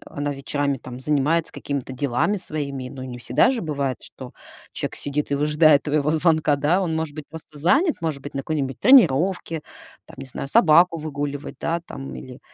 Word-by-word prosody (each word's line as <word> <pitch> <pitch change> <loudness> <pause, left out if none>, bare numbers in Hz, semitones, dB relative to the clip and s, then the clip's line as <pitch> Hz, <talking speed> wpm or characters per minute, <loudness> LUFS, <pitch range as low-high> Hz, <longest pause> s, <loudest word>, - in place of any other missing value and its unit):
она 145 0 -3
вечерами, 140 0 -2
там, 125 +1 -9
занимается 150 +4 +1
какими-то 140 -2 -4
делами 135 +9 0
своими. 140 -7 -5
Но 130 0 -8
не 125 -1 -7
всегда 120 - +3
же 255 -6 -2
бывает, 140 -5 -2
что - - -11 0.4
чек - - -4
сидит 145 0 -3
и - - +2
выжидает 150 0 +4
твоего 150 0 +1
звонка, 155 -2 +2
да? 155 +7 +2
Он 165 -3 -1
может 160 -2 -3
быть 155 -2 -7
просто 155 -1 -11
занят, 280 - +3
может 155 -5 -3
быть, 145 - -8
на 135 - -1
какой-нибудь 135 -3 -3
тренировке, 175 - +4 0.4
там, - - -15
не 135 - -7
знаю, 130 +1 -6
собаку 165 +3 +5
выгуливать, 145 -2 -5
да, 170 +1 -1
там 135 0 -8
или 125 -1 -10
145 Hz, 180 wpm, -23 LUFS, 140-160 Hz, 0.4 s, собаку